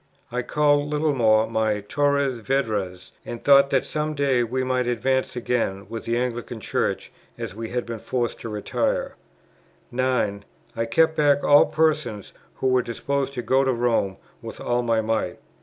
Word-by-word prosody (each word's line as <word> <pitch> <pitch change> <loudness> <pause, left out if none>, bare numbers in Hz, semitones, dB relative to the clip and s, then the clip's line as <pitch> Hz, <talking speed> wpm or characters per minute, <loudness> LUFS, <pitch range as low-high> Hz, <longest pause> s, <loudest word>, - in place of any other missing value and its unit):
I 125 +1 -1
called 145 +2 +2
Littlemore 130 -8 +3
my 110 -2 0
Torres 140 +2 0
Vedras, 105 -8 -2
and 120 - -7
thought 140 -1 +6
that 135 -2 +1
some 155 0 -2
day 135 -4 +2
we 130 +3 -2
might 130 -1 0
advance 130 +2 0
again 115 -5 -1
within 115 0 -5
the - - +1
Anglican 120 -1 -3
Church, - - -2 0.3
as 115 -5 -5
we 110 +1 -6
had 125 0 -2
been 115 -1 -6
forced 120 0 -2
to 115 - -6
retire; 105 -1 -2 0.8
9. 120 -5 0 0.3
I 115 0 -1
kept 160 +7 +3
back 145 -2 +3
all 145 0 +6
persons 150 -10 0 0.2
who 130 - 0
were 130 0 +3
disposed 140 +4 -2
to 125 - -3
go 135 +2 +3
to 130 -1 +1
Rome 115 -5 0 0.2
with - - -8
all 120 0 0
my 115 -2 +1
might. 110 0 -1
125 Hz, 165 wpm, -24 LUFS, 115-140 Hz, 0.8 s, thought